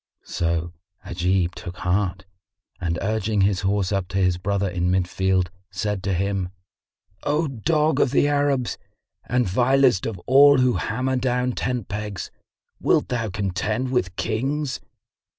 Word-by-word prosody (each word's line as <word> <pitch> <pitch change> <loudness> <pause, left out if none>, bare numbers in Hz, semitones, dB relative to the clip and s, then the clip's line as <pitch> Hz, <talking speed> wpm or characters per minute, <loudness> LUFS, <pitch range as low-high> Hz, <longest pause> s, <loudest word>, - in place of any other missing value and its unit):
So 85 0 -1 0.3
Ajib 90 0 0
took 90 -3 -8
heart 95 0 -1 0.5
and 85 -1 -1
urging 110 0 0
his 95 -1 +2
horse 95 0 0
up 95 -3 -1
to 90 - -3
his 90 -2 +2
brother 100 +1 0
in 90 -1 -1
mid 90 -1 +1
field, 95 -1 0 0.2
said 100 +1 -2
to 95 -1 -1
him, 95 0 -1 0.7
"O 150 +2 0
dog 150 +5 +1
of - - +4
the 140 +2 +3
Arabs 145 -3 0 0.5
and 125 -2 +2
vilest 125 +1 +3
of 110 -4 -4
all 140 +2 +7
who 125 -1 +3
hammer 130 +4 -1
down 125 0 0
tent 125 -3 -2
pegs, 105 -2 -5 0.5
wilt - - +2
thou 115 -3 -1
contend 105 +5 -2
with 95 -8 0
Kings? 135 +7 -2
105 Hz, 145 wpm, -23 LUFS, 95-125 Hz, 0.7 s, all